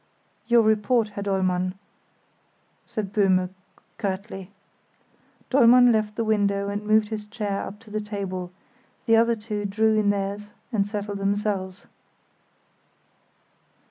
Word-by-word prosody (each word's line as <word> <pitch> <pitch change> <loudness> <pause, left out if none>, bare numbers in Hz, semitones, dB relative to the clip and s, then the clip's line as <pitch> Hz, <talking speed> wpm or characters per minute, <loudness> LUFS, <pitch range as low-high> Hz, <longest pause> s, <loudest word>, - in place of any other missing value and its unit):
"Your 235 -1 +5
report, 220 +1 +2
Herr 200 -1 -6
Dollmann," 185 -2 0 1.1
said 205 -3 -4
Böhme, 185 -3 +2 0.5
curtly. 195 -2 -4 1.0
Dollmann 245 -1 +7
left 215 -1 0
the 230 - -1
window 200 -2 +1
and 205 +1 -3
moved 215 0 +3
his 210 -1 -5
chair 210 -2 -3
up 205 - -7
to 220 -2 -16
the 215 0 -2
table; 195 -4 -5 0.5
the 225 -2 +5
other 230 +1 +4
two 210 -1 -5
drew 215 +2 +2
in 205 -1 +2
theirs 200 +1 -2 0.2
and 200 -2 +1
settled 205 -1 -4
themselves. 195 -1 -2
205 Hz, 120 wpm, -25 LUFS, 195-220 Hz, 1.1 s, Dollmann